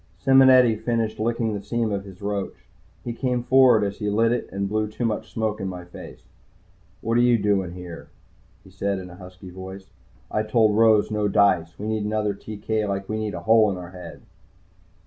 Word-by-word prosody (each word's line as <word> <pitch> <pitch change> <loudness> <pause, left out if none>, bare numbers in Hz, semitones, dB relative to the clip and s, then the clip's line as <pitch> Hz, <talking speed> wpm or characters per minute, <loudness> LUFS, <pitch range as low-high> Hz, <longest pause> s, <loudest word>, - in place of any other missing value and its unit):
Simonetti 130 0 +5
finished 110 0 -2
licking 115 0 -1
the 100 - -4
seam 115 0 -2
of 100 -1 -3
his 95 0 -13
roach. 100 -1 -4 0.4
He 120 - -4
came 125 0 -1
forward 130 -4 +5
as 100 0 -3
he 105 -2 -2
lit 115 +3 +2
it 120 - -2
and 100 0 -2
blew 110 +1 -1
too 110 +3 -4
much 110 -2 -3
smoke 110 -1 -2
in 95 - -3
my 90 -1 -7
face. 90 - -12 0.8
"What 115 +1 +1
you 120 -1 +4
doing 100 -4 0
here?" 90 -2 -10 0.5
he 95 - -17
said 100 +1 -2
in 90 -1 -8
a - - -11
husky 90 0 -12
voice. 95 +1 -10 0.4
"I 105 - 0
told 110 -1 +2
Rose 110 -1 +4
no 105 -1 0
dice. 95 -5 +2
We 105 - -6
need 110 -1 -1
another 105 -1 -1
TK 110 +1 -4
like 100 -1 -3
we 110 0 -3
need 105 -3 -3
a 85 - -6
hole 110 +2 +4
in 95 - -2
the 90 -1 -9
head." 90 -1 -11
105 Hz, 200 wpm, -23 LUFS, 95-115 Hz, 0.8 s, Simonetti